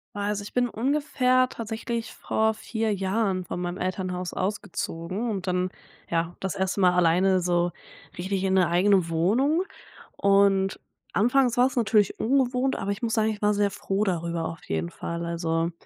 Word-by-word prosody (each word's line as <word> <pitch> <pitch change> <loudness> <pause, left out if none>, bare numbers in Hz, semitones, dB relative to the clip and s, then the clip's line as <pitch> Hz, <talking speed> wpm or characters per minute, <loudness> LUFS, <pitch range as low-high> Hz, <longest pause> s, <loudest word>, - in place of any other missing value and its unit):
Oh, - - -4
also, 205 0 -1
ich - - -10
bin 245 -1 +2
ungefähr 255 0 +2
tatsächlich 230 0 -4
vor 220 0 0
4 220 0 -2
Jahren 195 -1 0
von 175 - -5
meinem 175 +1 -3
Elternhaus 185 -1 -3
ausgezogen 190 +1 -3
und 195 -4 -3
dann, 180 0 0 0.4
ja, 170 +1 -1
das 190 -2 -3
1. 190 +1 -1
Mal 180 -2 +5
alleine 180 +2 +3
so 175 0 +1 0.5
richtig 190 +1 -2
in 190 -1 +1
'ne 185 -3 +4
eigene 185 0 +3
Wohnung 240 - +2 0.5
und 195 -1 +3 0.3
anfangs 245 +3 +3
war's 255 +2 +3
natürlich 215 -4 +2
ungewohnt, 260 +1 +1
aber 200 - -2
ich 200 - -4
muss 230 -2 -1
sagen, 220 -1 +2
ich 210 - -7
war 210 0 +3
sehr 205 -1 +1
froh 195 +2 -1
darüber, 170 -3 -1
auf 165 +1 -6
jeden 80 +1 -2
Fall. 170 - -5
Also, 165 0 -1
195 Hz, 165 wpm, -26 LUFS, 180-225 Hz, 0.5 s, Mal